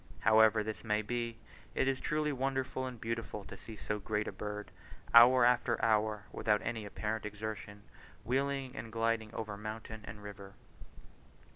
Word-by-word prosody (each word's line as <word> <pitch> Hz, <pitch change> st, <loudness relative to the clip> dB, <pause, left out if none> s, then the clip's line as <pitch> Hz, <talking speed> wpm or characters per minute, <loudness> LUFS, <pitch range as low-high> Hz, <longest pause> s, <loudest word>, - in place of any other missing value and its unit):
However 110 Hz, 0 st, +6 dB
this 110 Hz, 0 st, -5 dB
may 105 Hz, -1 st, +1 dB
be, 115 Hz, +1 st, -2 dB, 0.4 s
it -, -, +2 dB
is 135 Hz, -1 st, +1 dB
truly 150 Hz, 0 st, 0 dB
wonderful 130 Hz, -1 st, -1 dB
and 125 Hz, -3 st, -7 dB
beautiful 115 Hz, -2 st, -4 dB
to 95 Hz, -, -9 dB
see 110 Hz, +3 st, -10 dB
so 105 Hz, +1 st, -3 dB
great 105 Hz, +1 st, -1 dB
a -, -, -2 dB
bird, 105 Hz, 0 st, -6 dB, 0.4 s
hour 120 Hz, +1 st, +9 dB
after 120 Hz, -1 st, +3 dB
hour, 105 Hz, -1 st, +2 dB
without 105 Hz, -1 st, +1 dB
any 110 Hz, -3 st, -3 dB
apparent 110 Hz, +2 st, -3 dB
exertion, 105 Hz, -1 st, -6 dB, 0.4 s
wheeling 135 Hz, +1 st, 0 dB
and 115 Hz, -, -6 dB
gliding 115 Hz, -1 st, 0 dB
over 110 Hz, -2 st, -4 dB
mountain 110 Hz, +1 st, -6 dB
and 105 Hz, -1 st, -9 dB
river. 100 Hz, -1 st, -9 dB
110 Hz, 155 wpm, -33 LUFS, 105-120 Hz, 0.4 s, hour